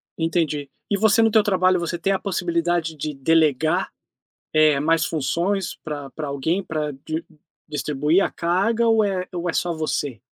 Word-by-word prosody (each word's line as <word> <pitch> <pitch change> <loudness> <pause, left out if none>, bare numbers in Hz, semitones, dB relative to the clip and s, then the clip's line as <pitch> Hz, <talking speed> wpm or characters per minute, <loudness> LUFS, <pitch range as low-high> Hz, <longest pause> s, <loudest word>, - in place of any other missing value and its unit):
Entendi. 160 -4 -1 0.2
E 200 - +1
você 220 +2 +4
no 225 -1 +4
teu 215 -1 +5
trabalho, 185 -3 +2
você 170 0 -3
tem 195 +4 0
a 190 - 0
possibilidade 175 -3 -1
de 150 0 -4
delegar, 155 +1 +2 0.6
eh, 155 -2 +4
mais 160 +1 +2
funções 170 +6 -1
pra 145 -3 -5
pra 150 +3 -5
alguém, 150 +7 -1
pra 155 -3 -3
di 155 +4 -5 0.4
distribuir 150 +4 +1
a - - 0
carga 200 +7 +1
ou 225 -1 +4
é 185 -2 -1
ou 175 0 -2
é - - -2
só 175 -1 0
você? 145 -6 -3
165 Hz, 170 wpm, -22 LUFS, 150-185 Hz, 0.6 s, teu